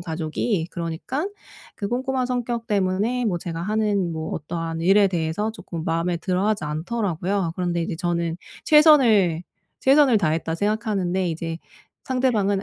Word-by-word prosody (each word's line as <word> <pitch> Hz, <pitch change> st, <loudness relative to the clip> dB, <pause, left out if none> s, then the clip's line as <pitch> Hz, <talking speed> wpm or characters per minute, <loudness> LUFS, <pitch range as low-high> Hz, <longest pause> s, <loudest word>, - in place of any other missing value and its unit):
가족이. 165 Hz, +2 st, -2 dB
그러니깐 175 Hz, -, -3 dB, 0.4 s
그 200 Hz, -, -4 dB
꼼꼼한 255 Hz, +2 st, -1 dB
성격 240 Hz, -2 st, -2 dB
때문에 205 Hz, +5 st, 0 dB
뭐 190 Hz, -6 st, 0 dB
제가 165 Hz, -1 st, -5 dB
하는 205 Hz, -3 st, 0 dB
뭐 160 Hz, 0 st, -4 dB
어떠한 165 Hz, +1 st, -4 dB
일에 195 Hz, +3 st, +5 dB
대해서 175 Hz, +4 st, -1 dB
조금 170 Hz, -7 st, -7 dB
마음에 165 Hz, +2 st, 0 dB
들어 185 Hz, +3 st, -1 dB
하지 210 Hz, -6 st, 0 dB
않더라고요. 175 Hz, +2 st, -2 dB
그런데 175 Hz, -2 st, -1 dB
이제 165 Hz, -, -3 dB
저는 170 Hz, -1 st, -1 dB, 0.3 s
'최선을, 240 Hz, -, +5 dB, 0.4 s
최선을 270 Hz, -3 st, +5 dB
다했다.' 160 Hz, -2 st, 0 dB
생각하는데 195 Hz, -2 st, 0 dB
이제 165 Hz, 0 st, -4 dB, 0.5 s
상대방은 220 Hz, -7 st, +1 dB
190 Hz, 340 characters per minute, -23 LUFS, 165-220 Hz, 0.5 s, 일에